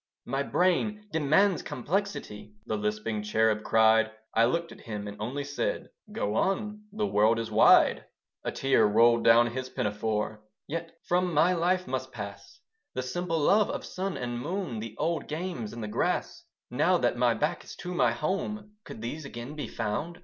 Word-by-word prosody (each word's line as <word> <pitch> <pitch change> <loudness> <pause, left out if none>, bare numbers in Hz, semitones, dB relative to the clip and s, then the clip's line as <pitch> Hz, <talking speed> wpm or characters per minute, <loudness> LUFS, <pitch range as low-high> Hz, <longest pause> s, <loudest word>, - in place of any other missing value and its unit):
"My 135 +2 -1
brain 210 +7 +1
demands 160 +5 +3
complexity." 135 - -4
The 110 - -2
lisping 105 +1 -2
cherub 110 0 +2
cried. 110 0 +4 0.2
I 115 +1 +5
looked 170 +7 -1
at - - -12
him, 105 -3 -6
and 100 - -6
only 130 +6 -3
said, 145 0 -3 0.2
"Go 105 - -2
on. 210 - -1
The 215 +1 -1
world 110 - +3
is 115 -1 -3
wide." 110 - +5 0.4
A - - -2
tear 135 0 +2
rolled 115 +2 +4
down 120 +1 +6
his 130 +1 -4
pinafore, 105 -1 -2 0.3
"Yet 165 +2 -4
from 180 0 +1
my 170 +5 +5
life 180 +2 +1
must 130 0 -3
pass 100 -3 -9 0.3
The 130 - -1
simple 165 +5 -2
love 200 +7 +4
of - - -4
sun 190 0 -4
and 120 -1 -3
moon, 170 - -3
The 110 0 -7
old 165 +2 -1
games 155 - -4
in 115 - -7
the 105 - -4
grass; 105 - -1 0.3
"Now - - +3
that - - +1
my - - +2
back - - -1
is - - -10
to 180 0 -6
my 125 -9 +3
home 195 - -3
Could 110 - -9
these 150 +7 -4
again 130 +1 -7
be 150 - -4
found?" 145 +11 -3
130 Hz, 175 wpm, -28 LUFS, 110-175 Hz, 0.4 s, down